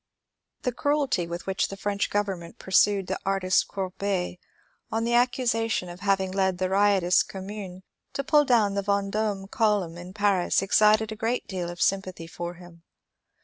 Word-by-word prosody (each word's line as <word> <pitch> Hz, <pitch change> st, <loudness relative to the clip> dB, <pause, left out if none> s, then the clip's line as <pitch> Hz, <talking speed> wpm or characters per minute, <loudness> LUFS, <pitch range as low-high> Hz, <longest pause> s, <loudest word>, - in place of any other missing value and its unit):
The 250 Hz, -, 0 dB
cruelty 275 Hz, -, 0 dB
with 170 Hz, +1 st, -6 dB
which 190 Hz, 0 st, 0 dB
the 195 Hz, -, -8 dB
French 200 Hz, 0 st, -1 dB
government 195 Hz, -5 st, -3 dB
pursued 195 Hz, +1 st, +3 dB
the 190 Hz, +1 st, -3 dB
artist 190 Hz, -1 st, +1 dB
Courbet 190 Hz, -1 st, -3 dB, 0.5 s
on 225 Hz, +1 st, 0 dB
the 235 Hz, +1 st, 0 dB
accusation 235 Hz, -5 st, +1 dB
of 175 Hz, +1 st, -9 dB
having 190 Hz, -1 st, +1 dB
led 190 Hz, -1 st, +1 dB
the 185 Hz, 0 st, -1 dB
riot 200 Hz, -1 st, +3 dB
ous 175 Hz, +1 st, +4 dB
Commune 190 Hz, -1 st, -7 dB, 0.3 s
to 275 Hz, -, -2 dB
pull 295 Hz, +1 st, +4 dB
down 230 Hz, -7 st, +3 dB
the 200 Hz, -, 0 dB
Vendome 200 Hz, 0 st, -1 dB
column 205 Hz, -7 st, 0 dB
in 180 Hz, +1 st, -9 dB
Paris 200 Hz, -3 st, +2 dB
excited 215 Hz, +2 st, +4 dB
a -, -, -4 dB
great 225 Hz, +3 st, -1 dB
deal 180 Hz, -3 st, -4 dB
of 175 Hz, 0 st, -8 dB
sympathy 185 Hz, -3 st, -1 dB
for 175 Hz, +1 st, -6 dB
him. 175 Hz, -1 st, -15 dB
195 Hz, 165 wpm, -26 LUFS, 185-215 Hz, 0.5 s, ous